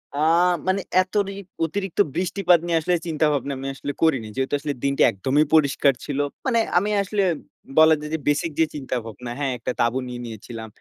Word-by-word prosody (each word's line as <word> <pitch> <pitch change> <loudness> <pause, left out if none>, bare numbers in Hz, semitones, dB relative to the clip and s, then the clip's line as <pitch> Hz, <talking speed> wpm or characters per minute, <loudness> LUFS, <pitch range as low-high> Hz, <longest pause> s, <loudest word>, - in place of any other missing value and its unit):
আ - - -4 0.5
মানে 190 +1 +2 0.2
এত 185 0 -7
রি 195 - -5 0.3
অতিরিক্ত 195 +3 -4 0.2
বৃষ্টিপাত 180 0 +3
নিয়ে 170 -1 +2
আসলে 175 +3 +1
চিন্তাভাবনা 150 -3 0
আমি 135 +1 -5
আসলে 145 - -4
করিনি। 135 -9 +2
যেহেতু 135 +1 -2
আসলে 145 0 -3
দিনটা 140 0 +2
একদমই 130 +9 +1
পরিষ্কার 140 -2 +4
ছিল। 145 -1 -3 0.3
মানে 240 -3 +2 0.2
আমি 200 +4 +2
আসলে 200 0 0 0.5
বলা 160 0 +8
যায় 150 0 -7
যে, - - +1
বেসিক 145 +3 +1
যে 160 - +5
চিন্তাভাবনা, 125 -4 -5
হ্যাঁ 140 -2 0
,একটা 115 - -3
তাঁবু 120 +2 +2
নিয়ে 125 -1 -6
নিয়েছিলাম। 110 0 -8
150 Hz, 180 wpm, -23 LUFS, 130-170 Hz, 0.5 s, বলা